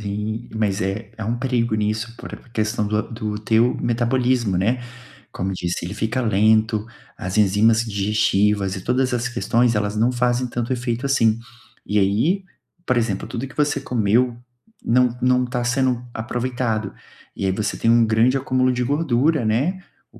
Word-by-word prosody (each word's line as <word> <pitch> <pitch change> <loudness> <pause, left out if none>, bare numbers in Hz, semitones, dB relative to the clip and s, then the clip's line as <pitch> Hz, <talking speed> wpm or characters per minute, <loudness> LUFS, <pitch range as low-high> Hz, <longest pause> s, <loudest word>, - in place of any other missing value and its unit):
Sim, 105 +3 -4
mas 105 -2 0
é, 100 +3 -3
há 110 - -4
um 120 +2 -1
perigo 120 -3 0
nisso 110 +2 -2
por - - -9
questão 110 -1 -1
do 105 +1 0
do 110 -2 -4
teu 110 +3 +2
metabolismo, 120 -3 +1
né. 115 +8 +1 0.5
Como 95 +1 -3
disse, 90 -1 -3
ele 95 - -5
fica 110 +4 -1
lento, 110 0 +2 0.3
as 95 +3 -4
enzimas 110 +3 +4
digestivas 100 -1 +1
e 95 - -6
todas 125 +1 +1
as 120 0 0
questões, 120 -1 +1
elas 105 0 -1
não 115 +4 +2
fazem 125 0 0
tanto 120 +1 -3
efeito 120 +1 -3
assim, 115 -5 +2 0.5
e 105 - 0
aí, 115 - +1 0.4
por 130 -1 +1
exemplo, 110 -5 -1
tudo 130 +3 -4
que - - -15
você 145 -1 +1
comeu 120 -1 +1 0.5
não 125 0 +2
não 125 0 +3
tá 125 0 -2
sendo 125 0 +1
aproveitado, 120 -2 -2 0.4
e 100 - -3
aí 95 - +2
você 105 +2 -2
tem 115 - +1
um 115 0 +5
grande 115 +4 +3
acúmulo 130 -1 +1
de 125 0 -1
gordura, 145 -1 +1
né. 140 - 0 0.3
O - - -17
115 Hz, 165 wpm, -21 LUFS, 105-125 Hz, 0.5 s, um